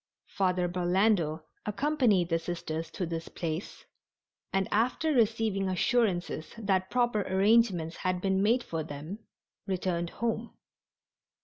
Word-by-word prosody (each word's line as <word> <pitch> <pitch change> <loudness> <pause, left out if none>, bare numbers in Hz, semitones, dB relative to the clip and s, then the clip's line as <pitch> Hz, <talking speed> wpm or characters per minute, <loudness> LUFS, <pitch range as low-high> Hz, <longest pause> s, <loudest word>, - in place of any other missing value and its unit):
Father 180 -2 +1
Burlando 175 -2 +1 0.2
accompanied 210 - +2
the 165 -1 +2
Sisters 165 -1 -4
to 180 - -3
this 165 0 -4
place, 165 +2 -5 0.7
and 195 -1 +1
after 255 +8 +1
receiving 220 -5 +2
assurances 185 -5 0
that 190 -4 0
proper 240 -4 +2
arrangements 190 -3 +2
had 185 -1 -1
been 190 +1 +1
made 235 +5 +3
for 165 -1 -3
them 155 +7 -7 0.5
returned 180 -2 -1
home. 230 +2 -3
190 Hz, 115 wpm, -29 LUFS, 170-220 Hz, 0.7 s, made